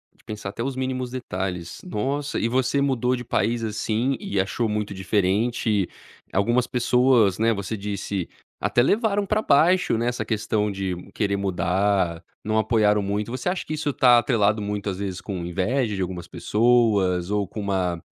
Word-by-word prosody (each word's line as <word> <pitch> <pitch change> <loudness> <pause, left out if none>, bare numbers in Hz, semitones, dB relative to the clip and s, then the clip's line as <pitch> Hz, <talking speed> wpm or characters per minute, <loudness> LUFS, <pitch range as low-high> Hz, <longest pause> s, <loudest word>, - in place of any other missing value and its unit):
De - - -27
pensar 105 -2 -6
até 115 - -6
os 135 0 -3
mínimos 130 -1 -2
detalhes, 95 -8 -5
nossa 140 - -2
e 115 - +1
você 130 +3 +1
mudou 130 -2 +1
de 125 - -6
país, 115 -1 0
assim, 110 +4 -1
e 100 - -2
achou 110 +4 0
muito 105 -1 -2
diferente, 100 +1 0 0.4
algumas 120 +6 +2
pessoas 125 -5 +3
né 115 +1 +3
você 100 +2 -4
disse, 100 -2 -4 0.3
até 120 - +3
levaram 205 - +2
pra 215 +2 +1
baixo 170 - +3
né 120 +1 0
essa 125 - -1
questão 105 -1 0
de 95 -2 -3 0.2
querer 100 -2 0
mudar, 95 -2 0 0.2
não 110 +1 0
apoiaram 105 -2 +3
muito. 105 +3 -2
Você 130 +7 -2
acha 185 - -2
que 155 - -4
isso 150 -1 -1
tá 120 -2 +6
atrelado 110 -4 +2
muitas 100 -2 -3
vezes 95 -2 -3
com 95 -4 -5
inveja 105 +6 0
de 95 - -3
algumas 90 -1 -4
pessoas 105 -6 +2
ou 100 -2 0
com 105 - -7
uma 95 -4 -1
105 Hz, 170 wpm, -24 LUFS, 100-125 Hz, 0.4 s, tá